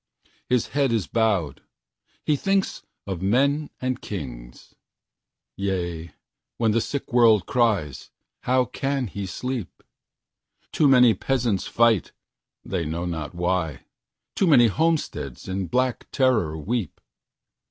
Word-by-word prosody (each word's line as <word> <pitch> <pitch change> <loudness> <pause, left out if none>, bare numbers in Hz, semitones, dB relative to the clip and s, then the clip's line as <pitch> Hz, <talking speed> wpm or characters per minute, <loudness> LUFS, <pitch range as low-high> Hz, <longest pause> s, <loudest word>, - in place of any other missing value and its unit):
His 125 -2 +1
head 140 -3 +1
is 110 -6 0
bowed. 105 - 0 0.6
He 150 - +3
thinks 195 +5 0 0.2
of 95 -3 -4
men 140 +9 +2
and 130 -1 -2
kings. - - -8 0.8
Yea, 85 -4 -3 0.4
when 115 -2 +2
the 115 +2 +2
sick 140 +1 -5
world 115 -5 +5
cries, 105 - 0 0.3
how 130 0 +2
can 135 0 -2
he 100 -2 -5
sleep? 125 +2 -5 0.9
Too 150 - +3
many 125 -4 +6
peasants 120 -7 -1
fight, 115 -5 +2 0.5
they 90 -3 -2
know 80 +3 -3
not 80 -1 -4
why; 85 -5 -1 0.5
Too 190 - +2
many 130 -7 +7
homesteads 155 - -1
in 95 0 -3
black 125 +2 0
terror 110 - +1
weep. 110 +6 -3
110 Hz, 120 wpm, -24 LUFS, 90-130 Hz, 0.9 s, many